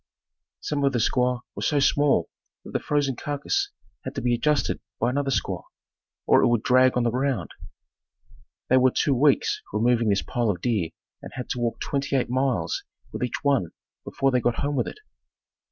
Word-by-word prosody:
Some 145 -2 -2
of 140 -1 +2
the 120 - +1
squaws 125 +2 +1
were - - -7
so 145 - +2
small 140 - +3 0.4
that - - -9
the - - 0
frozen 145 -3 0
carcass 145 - -2 0.3
had - - -6
to 135 - -2
be 120 -1 +2
adjusted 150 +4 +1 0.2
by 125 - +1
another 140 +1 -1
squaw 135 - -1 0.6
or - - +5
it - - +4
would 120 -2 +1
drag 130 0 +4
on 125 - +2
the 120 - +1
ground. 130 -7 -1 1.2
They 130 - +4
were 130 0 +5
two 140 +2 +1
weeks 140 +2 +2
removing 115 +1 +2
this 100 -1 +1
pile 120 -2 -1
of 90 -4 -1
deer 105 -7 0 0.3
and - - -9
had 125 -2 -6
to 125 - -2
walk 115 -1 -1
twenty 140 0 -1
eight 125 -2 0
miles 125 -11 0 0.3
with - - -6
each 125 -2 -3
one 135 - +1 0.3
before 135 0 0
they 125 -1 +2
got 120 0 0
home 145 0 -1
with 125 - 0
it. - - -7
125 Hz, 190 wpm, -25 LUFS, 120-140 Hz, 1.2 s, or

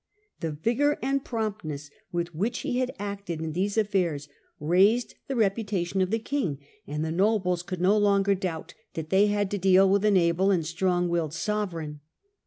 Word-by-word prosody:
The 160 -2 -3
vigour 245 - +1
and 275 +1 0
promptness 195 - -4 0.2
with 175 0 -2
which 215 +10 -2
he 260 -3 -1
had 255 0 0
acted 200 -5 -5
in 160 0 -3
these 200 +5 -1
affairs 180 -9 0 0.3
raised 195 +10 +3
the 270 - -2
reputation 195 -4 0
of 185 - +1
the 225 - +1
king; 225 - -2 0.3
and 150 +2 -2
the 160 - -2
nobles 185 -1 +1
could 180 -1 -6
no 190 +3 +4
longer 200 -1 +3
doubt 185 -4 -4 0.2
that 160 -1 -5
they 195 +2 +5
had 205 -1 0
to 205 - -1
deal 190 +1 +5
with 200 +1 +2
an 210 -2 +4
able 175 +2 +2
and 175 -5 +2
strong 175 +2 0
willed 165 -3 -1
sovereign. 170 -7 -3
190 Hz, 180 wpm, -27 LUFS, 170-210 Hz, 0.3 s, they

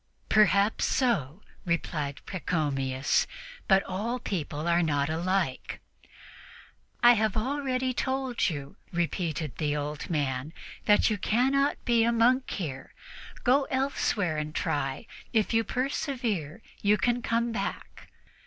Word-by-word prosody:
"Perhaps 205 0 +4
so," 200 - 0 0.2
replied 155 -4 -2
Pachomius; 145 -7 0 0.4
"but 195 0 +5
all 215 +7 -2
people 160 -8 -3
are 170 0 +3
not 145 -2 +1
alike." 175 -3 -1 1.2
"I 240 0 +9
have 220 -2 0
already 260 +1 -1
told 260 -2 0
you," 145 -3 -6
repeated 165 -4 -2
the 150 -2 0
old 150 0 -4
man, 145 -2 -1 0.3
"that 210 +1 +4
you 210 - -1
cannot 270 +8 +1
be 235 -2 +4
a 235 - +3
monk 245 +3 +3
here. 140 -8 -5 0.5
Go 270 +3 +4
elsewhere 250 - 0
and 150 0 -5
try; 135 +5 -1 0.3
if 220 -1 +2
you 225 0 +3
persevere 240 - -2 0.2
you 210 +1 +4
can 245 +1 +1
come 230 +1 0
back." 230 - -5
195 Hz, 120 wpm, -28 LUFS, 150-240 Hz, 1.2 s, I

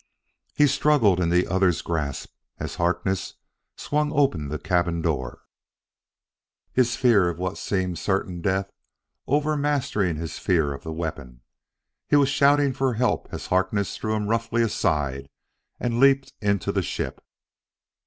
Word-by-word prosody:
He 150 - +5
struggled 140 -9 +3
in 85 -2 +1
the 90 +1 +3
other's 95 -5 +1
grasp 75 -5 -3 0.2
as - - -6
Harkness 90 +2 -1 0.4
swung 150 0 -1
open 110 - +1
the 75 - -3
cabin 85 0 0
door, 70 -7 -2 1.3
his 125 -1 +2
fear 105 -8 +4
of 85 - -5
what 95 +1 -3
seemed 95 -3 -2
a - - -6
certain 95 -3 -2
death 95 +1 -1 0.6
overmastering 145 - 0
his 80 0 -6
fear 80 -6 +1
of 70 - -9
the 80 - -6
weapon. 75 -7 -6 0.7
He - - +3
was 140 -2 +4
shouting 140 -1 +3
for 130 -1 0
help 125 +2 0
as - - -6
Harkness 95 +2 0
threw 110 0 -2
him 105 -1 -2
roughly 115 +1 +1
aside 70 -10 -1 0.5
and 120 -1 -1
leaped 135 0 +4
into 100 -3 0
the - - 0
ship. - - -4
95 Hz, 145 wpm, -24 LUFS, 85-130 Hz, 1.3 s, He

